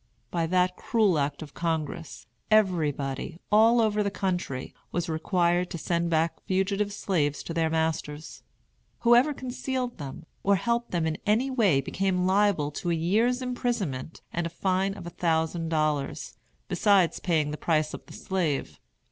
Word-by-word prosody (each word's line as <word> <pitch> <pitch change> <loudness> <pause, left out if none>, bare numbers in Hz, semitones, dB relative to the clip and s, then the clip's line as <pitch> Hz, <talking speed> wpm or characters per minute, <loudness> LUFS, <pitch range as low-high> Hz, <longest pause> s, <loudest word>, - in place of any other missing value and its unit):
By 165 -2 0
that 180 +1 +2
cruel 210 -8 +2
act 145 +2 -2
of 145 - -12
Congress, 165 -1 -3 0.2
everybody, 160 -10 +1
all 225 +3 +6
over 215 -2 +2
the 200 - +1
country, 180 -10 -3 0.2
was 175 0 -1
required 175 +2 +1
to 175 - -5
send 170 +1 -1
back 165 0 0
fugitive 195 +2 0
slaves 155 -8 -1
to 165 - -5
their 165 -1 +1
masters. 160 -1 -2 0.6
Whoever 240 +5 +5
concealed 255 -2 -4
them 140 0 -7 0.2
or 200 0 +3
helped 235 +5 0
them 170 -2 0
in 160 0 -2
any 235 +6 +2
way 200 - +3
became 180 +5 0
liable 190 -6 +2
to 175 - -2
a 170 - +2
year's 225 +10 +1
imprisonment 235 - -3
and 170 0 -1
a - - -6
fine 190 +3 0
of 175 - -9
a 175 - -6
thousand 165 0 0
dollars, 150 -4 -1 0.3
besides 190 -1 +3
paying 155 -5 +1
the - - -3
price 155 -2 +1
of - - -7
the - - -12
slave. 150 - -2
175 Hz, 155 wpm, -27 LUFS, 160-205 Hz, 0.6 s, all